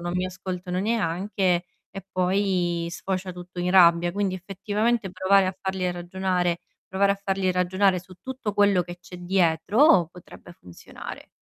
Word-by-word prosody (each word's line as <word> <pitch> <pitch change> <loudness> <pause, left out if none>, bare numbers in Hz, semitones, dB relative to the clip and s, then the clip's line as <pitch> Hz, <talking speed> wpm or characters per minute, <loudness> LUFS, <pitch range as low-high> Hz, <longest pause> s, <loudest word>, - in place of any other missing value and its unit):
non 175 0 -4
mi 180 0 0
ascoltano 185 -1 -5
neanche 190 -3 0 0.3
e 195 -1 -9
poi 180 -2 0
sfocia 185 +2 -4
tutto 180 0 -8
in 180 - 0
rabbia. 175 -2 +5
Quindi, 200 -1 -1
effettivamente, 205 +3 -1
provare 190 +1 +3
a 185 - -2
farli 190 -1 -2
ragionare 180 0 -1 0.3
provare 200 +1 +3
a 200 - -1
farli 195 -1 0
ragionare 185 +1 +2
su 185 +1 -13
tutto 260 -6 -5
quello 200 -3 +4
che 175 0 -10
c'è 180 - -11
dietro, 180 - +3
potrebbe 175 0 -14
funzionare. 90 - -11
185 Hz, 145 wpm, -25 LUFS, 175-195 Hz, 0.3 s, rabbia